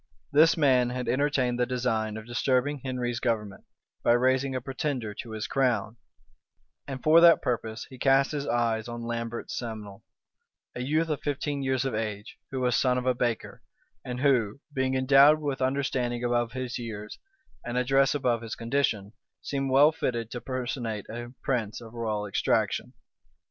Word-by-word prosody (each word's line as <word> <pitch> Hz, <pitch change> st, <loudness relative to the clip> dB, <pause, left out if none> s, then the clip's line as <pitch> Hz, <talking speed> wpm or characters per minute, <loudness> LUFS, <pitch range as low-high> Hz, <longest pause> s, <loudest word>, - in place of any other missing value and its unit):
This 160 Hz, +4 st, +5 dB
man 130 Hz, -5 st, +4 dB
had 125 Hz, 0 st, -4 dB
entertained 130 Hz, -1 st, +1 dB
the 125 Hz, -, +2 dB
design 115 Hz, -4 st, -1 dB
of 110 Hz, -, -8 dB
disturbing 130 Hz, +4 st, 0 dB
Henry's 125 Hz, -2 st, -2 dB
government, 110 Hz, -5 st, -2 dB, 0.4 s
by 120 Hz, -, +5 dB
raising 130 Hz, +2 st, +2 dB
a -, -, 0 dB
pretender 130 Hz, -3 st, -3 dB
to 115 Hz, -, -8 dB
his 110 Hz, -1 st, -4 dB
crown, 120 Hz, -5 st, 0 dB, 0.9 s
and 135 Hz, -2 st, -6 dB
for 160 Hz, +2 st, +7 dB
that 170 Hz, -1 st, +7 dB
purpose 115 Hz, -2 st, -2 dB
he 130 Hz, -2 st, -13 dB
cast 135 Hz, +1 st, +3 dB
his 145 Hz, -2 st, -3 dB
eyes 115 Hz, -2 st, 0 dB
on 120 Hz, 0 st, -6 dB
Lambert 115 Hz, 0 st, -4 dB
Simnel, 110 Hz, -4 st, -6 dB, 0.7 s
a 125 Hz, -, -5 dB
youth 155 Hz, +5 st, 0 dB
of 150 Hz, -, -2 dB
fifteen 145 Hz, 0 st, -2 dB
years 130 Hz, -1 st, 0 dB
of 135 Hz, -, -1 dB
age, 105 Hz, -1 st, -4 dB
who 130 Hz, -1 st, -3 dB
was 125 Hz, -1 st, +2 dB
son 125 Hz, -1 st, +2 dB
of 125 Hz, -, -2 dB
a 130 Hz, -, +3 dB
baker, 120 Hz, -2 st, -2 dB, 0.4 s
and 125 Hz, 0 st, -5 dB
who, 125 Hz, -5 st, +2 dB
being 130 Hz, -1 st, 0 dB
endowed 140 Hz, +3 st, +6 dB
with 145 Hz, -3 st, -3 dB
understanding 130 Hz, -2 st, -1 dB
above 120 Hz, -1 st, 0 dB
his 130 Hz, -1 st, -4 dB
years, 105 Hz, -3 st, -7 dB, 0.4 s
and 120 Hz, +1 st, -3 dB
address 135 Hz, +3 st, +3 dB
above 125 Hz, -5 st, +1 dB
his 115 Hz, -1 st, -6 dB
condition, 115 Hz, -4 st, -1 dB, 0.3 s
seemed 135 Hz, -1 st, -2 dB
well 140 Hz, +4 st, +6 dB
fitted 120 Hz, -7 st, -3 dB
to 120 Hz, -, -5 dB
personate 120 Hz, -4 st, -4 dB
a 120 Hz, +1 st, -6 dB
prince 115 Hz, -6 st, -1 dB
of 115 Hz, -1 st, -12 dB
royal 110 Hz, -3 st, -2 dB
extraction. 100 Hz, -, 0 dB
125 Hz, 165 wpm, -27 LUFS, 115-135 Hz, 0.9 s, for